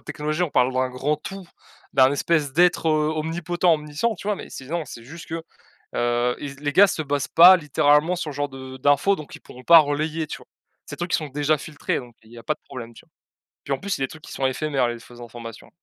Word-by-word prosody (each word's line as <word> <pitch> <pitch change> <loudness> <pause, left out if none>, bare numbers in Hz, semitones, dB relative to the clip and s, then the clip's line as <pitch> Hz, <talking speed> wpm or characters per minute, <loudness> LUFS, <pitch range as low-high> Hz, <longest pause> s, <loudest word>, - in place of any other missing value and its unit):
technologie, 155 +3 -3
on 175 - 0
parle 125 0 +2
d'un 130 0 0
grand 135 +4 -1
tout, 190 +4 -9 0.5
d'un 130 -1 +5
espèce 145 0 0
d'être, 175 +1 +3
heu, 155 0 +2
omnipotent, 170 +2 0
omniscient, 150 +9 -2
tu 190 - -10
vois? 210 - +1
Mais - - -9
c'est 130 - -9
non, 165 +2 -3
c'est 115 - -11
juste 160 +7 -11
que, 165 0 -4 0.5
heu, 120 +1 +1
ils 140 -1 -6
les 145 0 -2
gars 200 +6 +7
se 160 - -2
basent 145 -2 -2
pas, 180 +3 +8
littéralement, 150 +2 +2
sur 165 -4 -4
ce - - -11
genre 145 0 -1
de 130 -1 -10
d'infos 145 +8 +3
donc 155 -7 -10
ils - - -16
pourront 125 - -14
pas 170 -1 +9
relayer, 155 +2 0
tu - - -7
vois? - - -19 0.4
Ces - - -8
trucs, 175 +1 -4
ils - - +6
sont 155 -2 -5
déjà 145 +2 +1
filtrés, 145 0 -3
donc, 120 -2 -14
heu, - - -19
il - - -18
y 120 - -11
a - - -11
pas 155 - -1
de - - -31
problème, 120 -2 -9
tu - - -15
vois? - - -40 0.5
Puis, 140 - -2
en - - -1
plus, 200 - -7
c'est 135 - -1
des - - 0
trucs 155 +3 -13
qui - - -11
sont 135 - -2
éphémères, 135 -1 0
les 120 0 -5
fausses 120 +1 -14
informations. 115 -1 -10
145 Hz, 260 wpm, -23 LUFS, 130-160 Hz, 0.5 s, pas